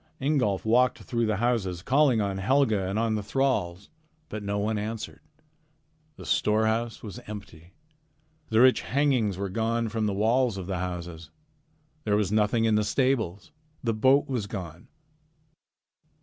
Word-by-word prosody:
Ingolf 130 -9 0
walked 125 +3 +2
through 115 -2 -1
the 110 - +1
houses 100 -6 -1
calling 135 -3 +3
on 100 -1 -2
Helga 110 -4 +2
and 100 +2 -2
on 115 0 +1
the 105 - -1
thralls, 100 -5 -1 0.4
but 110 - -5
no 100 0 -2
one 105 +1 -1
answered. 110 +1 -5 1.0
The - - -11
storehouse 110 +2 0
was 110 +2 -7
empty. 95 -4 -10 0.7
The 110 +1 +3
rich 130 0 +5
hangings 130 -8 +1
were 100 +1 -2
gone 115 +3 -1
from 110 0 -1
the 100 - -1
walls 115 +2 +1
of 95 - -5
the 95 -1 -3
houses. 85 -3 -6 0.7
There 105 -1 +1
was 105 -2 0
nothing 110 +2 +2
in 110 - +2
the 105 0 +3
stables. 110 -5 -1 0.3
The 115 -2 0
boat 130 +6 +3
was 120 -7 -2
gone. 90 -5 -7
110 Hz, 150 wpm, -27 LUFS, 100-120 Hz, 1.0 s, rich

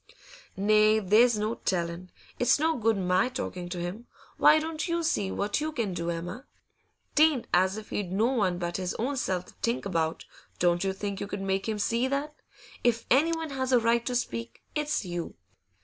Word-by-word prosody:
'Nay, 215 +2 +4
there's 220 +3 +4
no 215 +2 -1
telling. 175 -3 -2 0.3
It's 245 - +4
no 320 +2 +1
good 225 -2 +1
my 185 +5 +2
talkin' 185 -9 -5
to 175 - -5
him. 185 +8 -5 0.3
Why 310 - +7
don't 315 +2 -2
you 340 0 0
see 205 - 0
what 205 +8 -1
you 310 +1 -1
can 230 -10 -2
do, 170 -1 -3
Emma? 175 +10 -5 0.7
'Tain't 305 -5 +4
as 185 +3 +3
if 215 -1 -9
he'd 190 -4 -3
no 205 +4 +2
one 210 -8 +1
but 175 -1 -3
his 185 -1 -3
own 265 +5 -1
self 185 -8 -1
to - - -16
think 235 -1 -1
about 165 -4 -1 0.3
Don't 175 0 +2
you 195 - +1
think 200 0 -4
you 200 - -4
could 200 -1 -5
make 195 +2 -1
him 215 - -1
see 230 +4 +1
that? 280 +3 -2 0.5
If 230 -1 +2
anyone 320 +3 +2
has 260 -1 -2
a 250 - +6
right 230 0 +2
to 250 - -1
speak, 115 - -3
it's 300 -7 -1
you. 175 -1 -5
215 Hz, 195 wpm, -28 LUFS, 185-255 Hz, 0.7 s, Why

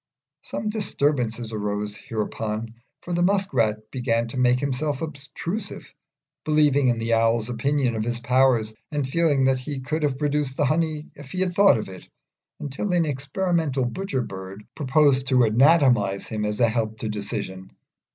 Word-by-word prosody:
Some 210 +2 -4
disturbance 145 - 0 0.2
arose 105 0 -3
hereupon, 110 +1 -4 0.3
for 175 - -4
the 175 - +1
Musk 195 0 +1
rat 110 -3 0
began 115 -3 0
to 130 - -7
make 125 0 +3
himself 140 +1 -1
obtrusive, 160 +7 -6 0.5
believing 150 -3 +3
in 120 -1 +2
the 115 0 -1
Owl's 115 0 +2
opinion 125 +1 0
of 110 - -1
his 120 +1 -2
powers, 125 -3 +2 0.2
and 145 -3 -1
feeling 145 -2 +2
that 130 -1 +2
he 135 +2 -5
could 155 +5 -3
have 145 -3 0
produced 145 -2 -1
the 145 - +2
honey 155 +1 0
if 140 -1 -12
he 185 - -1
had 185 -1 +1
thought 200 - +6
of 110 - -4
it; 95 -1 -11 0.5
until 145 +8 -3
an 170 -2 +3
experimental 145 0 -1
Butcher 135 -1 -2
bird 95 +1 -8
proposed 140 -2 +2
to 130 -2 +4
anatomise 120 -4 +4
him 110 -1 -3
as 105 +2 -2
a 120 - +5
help 110 -1 -1
to 110 - -2
decision. 100 -3 -4
130 Hz, 165 wpm, -24 LUFS, 115-150 Hz, 0.5 s, thought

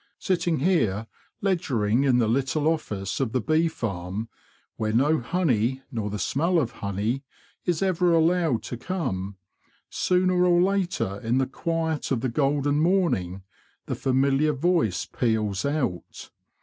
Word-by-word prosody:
Sitting 175 - 0
here 115 - +1 0.4
ledgering 130 - +1
in 130 -3 +4
the 115 -3 +2
little 135 +6 0
office 105 - -2
of 130 -5 -1
the 130 - +2
bee 155 +7 +2
farm—where 110 - -5
no 145 +7 +3
honey, 130 - 0
nor 110 -4 -3
the 105 - -4
smell 165 - +1
of 130 -8 +1
honey, 105 +4 -2 0.4
is 175 0 0
ever 180 -2 +2
allowed 165 -5 +2
to 120 - -5
come—sooner 180 - -2
or 175 -1 +4
later, 180 - 0
in 115 +3 0
the 135 - +2
quiet 160 +3 -2
of 125 -4 0
the 130 - 0
golden 145 +2 +1
morning, 140 - +1 0.4
the - - -3
familiar 135 +3 +2
voice 140 - +1
peals 110 -4 -1
out. 140 - -3
135 Hz, 135 wpm, -25 LUFS, 110-165 Hz, 0.4 s, in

